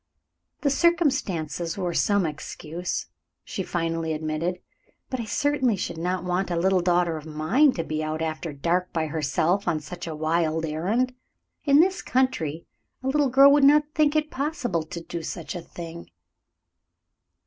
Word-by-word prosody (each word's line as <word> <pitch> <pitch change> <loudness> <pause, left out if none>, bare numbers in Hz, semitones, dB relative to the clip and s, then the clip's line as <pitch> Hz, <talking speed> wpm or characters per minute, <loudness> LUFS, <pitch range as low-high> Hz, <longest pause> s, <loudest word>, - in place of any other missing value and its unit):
"The 280 - +2
circumstances 260 - +1
were 180 -3 -1
some 200 0 +2
excuse," 160 +2 -4 0.4
she 190 - -4
finally 165 -2 -2
admitted. 155 +3 -2 0.5
"But 260 - -2
I 230 - -3
certainly 260 +1 +1
should 170 -3 -4
not 180 +1 -1
want 180 +1 -1
a 175 - -1
little 185 +2 +3
daughter 175 -2 +2
of 155 0 -9
mine 170 - +3
to 165 - -2
be 155 0 -3
out 155 0 -2
after 160 0 -3
dark 170 +6 -1
by 160 -1 0
herself 160 +5 0
on 165 -3 +1
such 175 +3 -8
a 160 - -4
wild 160 +1 0
errand. 200 +12 0 0.5
In 285 +1 +6
this 370 +1 +1
country 170 - 0 0.4
a 265 - 0
little 290 0 +2
girl 275 +2 +7
would 285 0 +5
not 295 +2 +5
think 300 0 +3
it 305 0 +1
possible 270 - -1
to 165 +2 -7
do 170 0 -5
such 160 - -5
a 175 - -5
thing." 170 0 -9
175 Hz, 160 wpm, -25 LUFS, 160-260 Hz, 0.5 s, girl